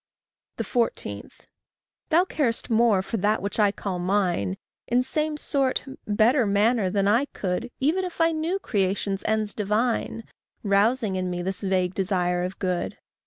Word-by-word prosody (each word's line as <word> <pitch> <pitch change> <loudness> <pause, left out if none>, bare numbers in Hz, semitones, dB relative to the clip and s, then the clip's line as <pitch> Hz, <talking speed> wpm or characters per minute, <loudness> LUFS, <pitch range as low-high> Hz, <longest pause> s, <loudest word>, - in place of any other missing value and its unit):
14. 165 - -2 0.8
Thou 340 +3 +4
carest 255 -8 -1
more 220 -4 +4
for 225 - -3
that 210 +2 +1
which 200 +3 -4
I 205 -2 +5
call 195 -3 -4
mine, 175 - 0 0.3
In 245 +1 +2
same 305 +3 -1
sort 275 -3 0 0.2
better 220 +4 +3
manner 205 0 +2
than 200 +1 +1
I 230 +7 +3
could, 200 -1 -3
Even 320 +8 +1
if 360 -2 -6
I 330 0 +4
knew 325 +4 -1
creation's 200 - -1
ends 215 -1 +1
divine, 225 +2 -1 0.4
Rousing 205 +1 +2
in 185 0 -1
me 175 0 -3
this 190 +1 -3
vague 185 -2 0
desire 180 -2 0
of 185 +1 -4
good. 180 -2 -2
210 Hz, 150 wpm, -25 LUFS, 190-250 Hz, 0.8 s, I